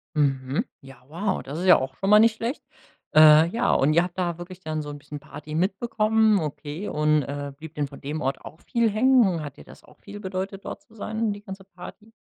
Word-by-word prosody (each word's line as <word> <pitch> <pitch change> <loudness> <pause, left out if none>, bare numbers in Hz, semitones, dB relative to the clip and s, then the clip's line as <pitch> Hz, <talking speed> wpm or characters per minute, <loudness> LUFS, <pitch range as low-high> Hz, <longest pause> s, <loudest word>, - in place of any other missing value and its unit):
Mhm. 135 -2 0 0.2
Ja, 135 -2 -15
wow. 190 +6 -2
Das 145 +5 -6
ist 185 - -3
ja 180 - +8
auch 130 0 -4
schon 195 - -2
mal 210 - +8
nicht 225 0 +5
schlecht. 235 +6 -4 0.5
Äh, 155 +1 +8
ja, 235 +5 +1
und 145 +3 +3
ihr 170 +2 +4
habt 180 0 -7
da 175 -2 -1
wirklich 180 +1 -9
dann 155 -3 -4
so 150 - -7
'n 145 - -7
bisschen 145 0 -9
Party 150 +1 -10
mitbekommen, 215 +3 +2
okay. 155 +4 -5
Und, 150 0 +2
äh, 145 0 -5
blieb 155 +2 -11
denn 145 -1 -1
von 140 - -13
dem 150 +2 -4
Ort 135 +1 -2
auch 160 - -11
viel 235 -1 +1
hängen? 215 -6 +3
Hat 145 -2 -8
dir - - -12
das - - -16
auch - - -21
viel 205 0 -10
bedeutet, 190 0 -5
dort - - -6
zu 225 - -23
sein, 220 +1 -2
die 205 - -10
ganze 195 -1 -9
Party? 195 +4 -13
175 Hz, 230 wpm, -25 LUFS, 150-205 Hz, 0.5 s, ja